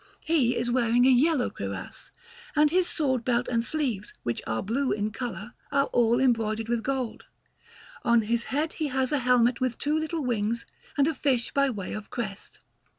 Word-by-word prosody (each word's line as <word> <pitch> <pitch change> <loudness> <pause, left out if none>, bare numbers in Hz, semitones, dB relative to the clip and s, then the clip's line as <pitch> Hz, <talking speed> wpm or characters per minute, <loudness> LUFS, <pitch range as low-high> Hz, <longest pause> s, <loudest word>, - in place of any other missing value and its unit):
He 280 -7 +2
is 240 - -1
wearing 240 0 +3
a 265 - +6
yellow 275 +1 +3
cuirass, - - -6 0.5
and 300 0 +4
his 365 0 +2
sword 260 -6 0
belt 245 0 +1
and 230 -1 0
sleeves, 240 -7 -2
which 120 - -2
are 110 0 -1
blue 255 +6 0
in 210 0 -1
colour, 225 -2 -6 0.2
are 280 0 +3
all 235 0 +3
embroidered 225 -4 +1
with 235 -1 0
gold. 260 -2 -3 0.8
On 235 -1 +4
his 235 +2 0
head 300 +4 -1
he 310 - -2
has 265 0 0
a 295 - +2
helmet 245 -1 +3
with 255 -2 0
two 295 +1 0
little 315 0 -2
wings 230 -1 -1 0.3
and 285 0 +4
a 320 - +1
fish 260 -4 0
by 275 -1 +3
way 205 -7 -5
of 215 -1 -7
crest. 215 -5 -6
245 Hz, 185 wpm, -27 LUFS, 230-275 Hz, 0.8 s, a